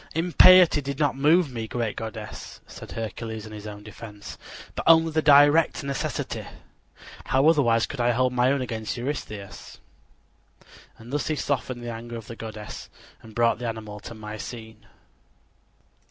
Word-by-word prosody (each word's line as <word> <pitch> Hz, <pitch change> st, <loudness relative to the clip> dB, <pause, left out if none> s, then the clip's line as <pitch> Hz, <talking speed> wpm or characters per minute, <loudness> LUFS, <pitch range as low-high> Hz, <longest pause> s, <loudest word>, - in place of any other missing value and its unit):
"Impiety 175 Hz, -1 st, +6 dB
did 140 Hz, 0 st, -5 dB
not 145 Hz, -3 st, +1 dB
move 150 Hz, +3 st, +3 dB
me, 115 Hz, -2 st, -5 dB
great 115 Hz, -2 st, -2 dB
goddess," 110 Hz, -2 st, -7 dB
said -, -, -11 dB
Hercules 110 Hz, -1 st, -5 dB
in 110 Hz, -, -10 dB
his 105 Hz, 0 st, -8 dB
own 105 Hz, -1 st, -9 dB
defense, 105 Hz, -1 st, -10 dB, 0.4 s
"but -, -, -4 dB
only 165 Hz, 0 st, +6 dB
the 155 Hz, 0 st, +1 dB
direst 145 Hz, +2 st, +5 dB
necessity. 140 Hz, -1 st, -3 dB, 0.8 s
How 135 Hz, +3 st, +3 dB
otherwise 120 Hz, -8 st, +4 dB
could 140 Hz, -, -5 dB
I 120 Hz, -, +2 dB
hold 125 Hz, +1 st, +1 dB
my 125 Hz, +1 st, +3 dB
own 140 Hz, -1 st, 0 dB
against 110 Hz, -1 st, -4 dB
Eurystheus?" 120 Hz, -6 st, -6 dB, 1.2 s
And 115 Hz, +4 st, -12 dB
thus 145 Hz, -, -1 dB
he 155 Hz, -, 0 dB
softened 130 Hz, -4 st, -2 dB
the 120 Hz, -, -4 dB
anger 120 Hz, +1 st, -8 dB
of 115 Hz, -, -9 dB
the 115 Hz, -, -9 dB
goddess 110 Hz, -2 st, -8 dB, 0.3 s
and 110 Hz, -1 st, -14 dB
brought 115 Hz, -1 st, +2 dB
the 120 Hz, -, -3 dB
animal 110 Hz, -2 st, -6 dB
to 115 Hz, -, -9 dB
Mycene. 110 Hz, +1 st, -8 dB
120 Hz, 155 wpm, -25 LUFS, 110-140 Hz, 1.2 s, Impiety